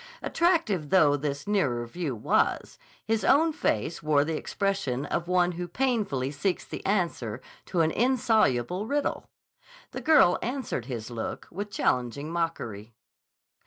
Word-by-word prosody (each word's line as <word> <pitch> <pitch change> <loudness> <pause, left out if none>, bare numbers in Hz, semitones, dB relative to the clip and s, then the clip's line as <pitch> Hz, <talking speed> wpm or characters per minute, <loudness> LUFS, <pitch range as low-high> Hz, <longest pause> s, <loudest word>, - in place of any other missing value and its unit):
Attractive 320 - +1
though 150 -5 +5
this 145 +1 -3
nearer 140 -13 +1
view 145 +1 -4
was, 105 - 0 0.3
his 225 0 0
own 315 +4 +4
face 135 - -1
wore 150 -1 +3
the 160 +1 -2
expression 175 -8 -2
of 170 +3 -2
one 180 0 +3
who 175 0 -5
painfully 200 - -1
seeks 180 +6 -2
the - - -7
answer 165 - -1 0.3
to 175 - +1
an 160 0 +2
insoluble 220 - +2
riddle. 290 +2 -1 0.6
The - - -6
girl 310 - +5
answered 260 +2 -3
his 120 -3 -6
look 115 -2 -5
with 205 +4 -5
challenging 135 - -1
mockery. 115 -11 -3
170 Hz, 135 wpm, -27 LUFS, 135-210 Hz, 0.6 s, though